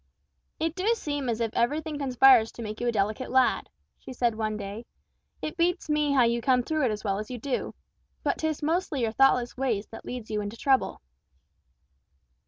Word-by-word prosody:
"It 320 Hz, 0 st, 0 dB
do 370 Hz, +3 st, -3 dB
seem 290 Hz, -, -3 dB
as 230 Hz, -1 st, -1 dB
if 225 Hz, -2 st, -1 dB
everything 295 Hz, +5 st, -1 dB
conspires 255 Hz, -4 st, +5 dB
to 235 Hz, -, -7 dB
make 215 Hz, +1 st, -6 dB
you 240 Hz, -, 0 dB
a -, -, +3 dB
delicate 215 Hz, +3 st, -1 dB
lad," 260 Hz, 0 st, +2 dB, 0.3 s
she 260 Hz, -, -9 dB
said 240 Hz, -2 st, +1 dB
one 215 Hz, -1 st, -2 dB
day; 205 Hz, +3 st, -7 dB, 0.6 s
"it 310 Hz, +3 st, -4 dB
beats 350 Hz, -1 st, 0 dB
me 300 Hz, -1 st, +2 dB
how 260 Hz, -3 st, +5 dB
you 235 Hz, 0 st, +1 dB
come 250 Hz, 0 st, +3 dB
through 310 Hz, +1 st, 0 dB
it -, -, +2 dB
as 210 Hz, 0 st, -5 dB
well 200 Hz, -2 st, -1 dB
as 215 Hz, -, -6 dB
you 250 Hz, -, -5 dB
do! 255 Hz, +3 st, -3 dB, 0.5 s
But -, -, 0 dB
'tis 315 Hz, -2 st, -2 dB
mostly 320 Hz, -3 st, 0 dB
your 225 Hz, -2 st, +1 dB
thoughtless 250 Hz, 0 st, +3 dB
ways 235 Hz, -6 st, 0 dB
that 225 Hz, -, -9 dB
leads 245 Hz, -3 st, -7 dB
you 210 Hz, -1 st, -1 dB
into 205 Hz, +2 st, -6 dB
trouble." 265 Hz, +1 st, +1 dB
250 Hz, 195 wpm, -27 LUFS, 225-290 Hz, 0.6 s, conspires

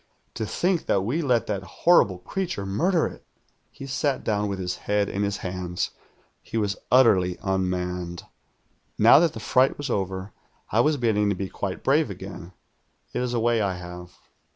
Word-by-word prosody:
To 110 Hz, -2 st, -3 dB
think 175 Hz, -, 0 dB
that 100 Hz, -, +2 dB
we 125 Hz, -, -1 dB
let 125 Hz, -7 st, +2 dB
that 100 Hz, -2 st, -2 dB, 0.2 s
horri 175 Hz, -, +7 dB
])le 90 Hz, -, -6 dB
creature 175 Hz, -, -4 dB
murder 165 Hz, -, +1 dB
it.' -, -, -7 dB, 0.5 s
"He 135 Hz, -, -10 dB
sat 135 Hz, 0 st, -1 dB
down 105 Hz, -1 st, 0 dB
with 100 Hz, -1 st, -3 dB
his 90 Hz, -1 st, -3 dB
head 105 Hz, 0 st, +2 dB
in 100 Hz, -, -3 dB
his 100 Hz, 0 st, 0 dB
hands. 90 Hz, -1 st, -3 dB, 0.5 s
He -, -, -5 dB
was 105 Hz, -2 st, 0 dB
utterly 100 Hz, -9 st, +4 dB
unmanned. 90 Hz, -2 st, -2 dB, 0.8 s
"Xow -, -, +8 dB
that 165 Hz, -2 st, +2 dB
the 110 Hz, -, -7 dB
fright 130 Hz, +5 st, +2 dB
was 145 Hz, -3 st, -4 dB
over, 95 Hz, -1 st, -3 dB, 0.4 s
I 110 Hz, -, +2 dB
was 150 Hz, +5 st, +3 dB
beginning 105 Hz, -4 st, +2 dB
io 100 Hz, -, 0 dB
be 95 Hz, 0 st, -4 dB
quite 95 Hz, -2 st, -4 dB
brave 145 Hz, 0 st, +3 dB
again. 95 Hz, -2 st, -8 dB, 0.6 s
It -, -, -1 dB
is 125 Hz, -1 st, -1 dB
a -, -, +1 dB
way 115 Hz, 0 st, +2 dB
I 100 Hz, -3 st, 0 dB
have. 90 Hz, 0 st, -10 dB
100 Hz, 180 wpm, -25 LUFS, 95-125 Hz, 0.8 s, Xow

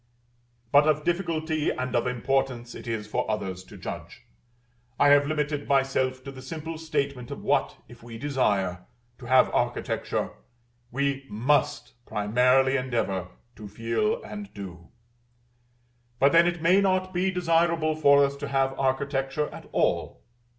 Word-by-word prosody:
But 145 Hz, +2 st, +6 dB
of 150 Hz, -1 st, +2 dB
difficulty 160 Hz, -3 st, -1 dB
and 130 Hz, 0 st, -3 dB
of 120 Hz, -, +1 dB
importance 125 Hz, -1 st, -1 dB
it 115 Hz, -, -10 dB
is 115 Hz, -2 st, -3 dB
for 105 Hz, -, -2 dB
others 95 Hz, -4 st, -3 dB
to -, -, -13 dB
judge. -, -, -8 dB, 0.8 s
I 145 Hz, -, +6 dB
have 145 Hz, 0 st, +5 dB
limited 150 Hz, -1 st, -2 dB
myself 130 Hz, -1 st, +1 dB
to 135 Hz, -, -7 dB
the 130 Hz, -1 st, -11 dB
simple 160 Hz, +4 st, -6 dB
statement 140 Hz, -6 st, -2 dB
of -, -, -7 dB
what, -, -, +1 dB
if 120 Hz, -, -15 dB
we 115 Hz, -1 st, -9 dB
desire 100 Hz, -10 st, 0 dB, 0.3 s
to 120 Hz, -, -10 dB
have 130 Hz, +1 st, +4 dB
architecture, -, -, -1 dB, 0.6 s
we 140 Hz, +2 st, -1 dB
MUST 140 Hz, +6 st, 0 dB
primarily 125 Hz, +5 st, +3 dB
endeavor 115 Hz, -8 st, -1 dB, 0.3 s
to 105 Hz, -, -9 dB
feel 115 Hz, -, -1 dB
and 205 Hz, -1 st, -8 dB
do: 90 Hz, -4 st, -9 dB, 1.3 s
but 140 Hz, +3 st, +4 dB
then 170 Hz, +1 st, +6 dB
it 175 Hz, -2 st, -2 dB
may 185 Hz, +4 st, +5 dB
not 185 Hz, -1 st, +1 dB
be 185 Hz, +2 st, +1 dB
desirable 165 Hz, -3 st, +1 dB
for 140 Hz, -2 st, +5 dB
us 140 Hz, 0 st, -3 dB
to -, -, -5 dB
have 135 Hz, -1 st, 0 dB
architecture 135 Hz, +2 st, 0 dB
at -, -, -11 dB
all. -, -, 0 dB
135 Hz, 145 wpm, -26 LUFS, 120-155 Hz, 1.3 s, But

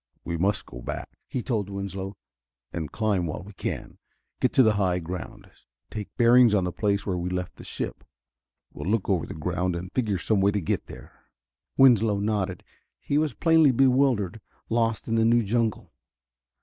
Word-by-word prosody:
"We 85 Hz, -, -2 dB
must 95 Hz, +5 st, 0 dB
go -, -, -10 dB
back," -, -, -5 dB, 0.2 s
he 125 Hz, -, -3 dB
told 110 Hz, -7 st, -1 dB
Winslow, 100 Hz, 0 st, -5 dB, 0.6 s
"and 80 Hz, -5 st, -4 dB
climb 105 Hz, -6 st, 0 dB
while 80 Hz, -, -5 dB
we 100 Hz, +2 st, -12 dB
can. -, -, -5 dB, 0.4 s
Get -, -, +2 dB
to 130 Hz, -, +6 dB
the 110 Hz, -2 st, +4 dB
high 95 Hz, -3 st, +1 dB
ground, 90 Hz, +1 st, -7 dB, 0.4 s
take 105 Hz, -2 st, -5 dB
bearings 120 Hz, -1 st, +6 dB
on 95 Hz, -, +2 dB
the 90 Hz, -, -1 dB
place 100 Hz, +1 st, 0 dB
where 90 Hz, -3 st, -1 dB
we 90 Hz, +1 st, -2 dB
left 90 Hz, -1 st, -4 dB
the -, -, -11 dB
ship. -, -, -5 dB, 0.7 s
We'll 75 Hz, +5 st, -5 dB
look 110 Hz, -2 st, +1 dB
over 90 Hz, -5 st, 0 dB
the -, -, -7 dB
ground 90 Hz, +3 st, -1 dB
and 90 Hz, +1 st, -6 dB
figure 110 Hz, -6 st, 0 dB
some 100 Hz, +2 st, +1 dB
way 100 Hz, -, +4 dB
to 105 Hz, -, +1 dB
get 85 Hz, -, -2 dB
there." -, -, -13 dB, 0.5 s
Winslow 115 Hz, -6 st, +5 dB
nodded. 100 Hz, -3 st, -1 dB, 0.4 s
He 145 Hz, -, 0 dB
was 155 Hz, -2 st, -1 dB
plainly 160 Hz, -3 st, +5 dB
bewildered, 125 Hz, -6 st, +2 dB, 0.3 s
lost 115 Hz, -1 st, 0 dB
in 115 Hz, -, -1 dB
the 115 Hz, 0 st, +3 dB
new 115 Hz, +1 st, +4 dB
jungle. 110 Hz, 0 st, -1 dB
100 Hz, 180 wpm, -26 LUFS, 90-115 Hz, 0.7 s, to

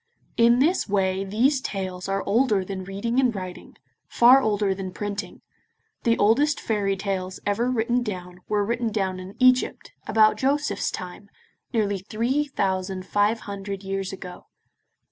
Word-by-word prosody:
In 235 Hz, +1 st, +5 dB
this 305 Hz, -, +2 dB
way 190 Hz, -1 st, +1 dB
these 245 Hz, +8 st, +1 dB
tales 185 Hz, -4 st, -4 dB
are 195 Hz, 0 st, -1 dB
older 210 Hz, -2 st, +2 dB
than 190 Hz, 0 st, -5 dB
reading 205 Hz, +6 st, -2 dB
and 250 Hz, -4 st, +2 dB
writing, 185 Hz, -2 st, -8 dB, 0.3 s
far 250 Hz, +3 st, +6 dB
older 205 Hz, -4 st, +1 dB
than 190 Hz, -1 st, -6 dB
printing. 205 Hz, +1 st, -5 dB, 0.6 s
The 230 Hz, -1 st, +3 dB
oldest 280 Hz, +9 st, +3 dB
fairy 200 Hz, -3 st, -1 dB
tales 190 Hz, -1 st, -3 dB
ever 225 Hz, +5 st, +1 dB
written 240 Hz, 0 st, +1 dB
down 180 Hz, -5 st, -6 dB
were 205 Hz, -1 st, +1 dB
written 235 Hz, +1 st, -1 dB
down 190 Hz, -3 st, -1 dB
in 185 Hz, +2 st, -9 dB
Egypt, 255 Hz, 0 st, +2 dB, 0.2 s
about 215 Hz, 0 st, +4 dB
Joseph's 285 Hz, +3 st, 0 dB
time, 185 Hz, +2 st, -8 dB, 0.4 s
nearly 205 Hz, -5 st, 0 dB
three 235 Hz, +9 st, -1 dB
thousand 190 Hz, -7 st, -2 dB
five 210 Hz, +3 st, +1 dB
hundred 200 Hz, -1 st, -6 dB
years 195 Hz, 0 st, -3 dB
ago. 180 Hz, -2 st, -9 dB
205 Hz, 145 wpm, -24 LUFS, 195-235 Hz, 0.6 s, far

